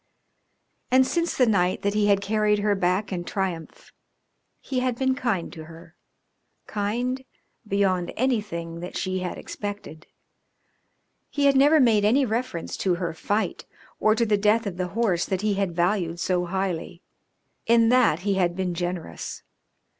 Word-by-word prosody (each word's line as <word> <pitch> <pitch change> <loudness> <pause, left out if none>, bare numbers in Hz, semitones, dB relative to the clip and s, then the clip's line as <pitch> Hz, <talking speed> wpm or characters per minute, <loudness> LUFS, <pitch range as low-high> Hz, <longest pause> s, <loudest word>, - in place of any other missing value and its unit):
And 260 +1 +5
since 340 +4 -1
the 255 - +5
night 185 -5 +1
that 200 0 +1
he 210 -1 +2
had 200 -1 +3
carried 210 +1 +1
her 205 0 +1
back 190 +2 0
in 175 -1 -3
triumph 180 -4 -5 0.7
he 260 - -3
had 250 -2 -1
been 265 0 +2
kind 235 -10 -2
to 160 -1 -9
her 165 +1 -14 0.7
kind 245 +6 -2 0.4
beyond 190 -3 +1
anything 205 -10 -1
that 175 +1 -6
she 185 0 -2
had 180 -1 -4
expected. 205 -6 -7 1.2
He 285 -1 0
had 280 -1 +5
never 290 +4 +6
made 225 -6 +4
any 255 +7 +4
reference 230 -6 -3
to 185 -2 +1
her 175 -2 -3
fight 205 +6 -2 0.3
or 215 0 +3
to 235 - +1
the 210 -2 +2
death 215 +3 +3
of 190 -3 -4
the 180 0 -1
horse 190 -7 +1
that 190 -1 -1
he 210 -1 +1
had 195 -3 -1
valued 175 -1 0
so 180 +1 0
highly; 180 -1 -3 0.6
in 230 0 +5
that 240 -10 +4
he 200 +1 0
had 180 -2 +1
been 185 -1 -2
generous. 175 - -5
200 Hz, 160 wpm, -25 LUFS, 180-230 Hz, 1.2 s, never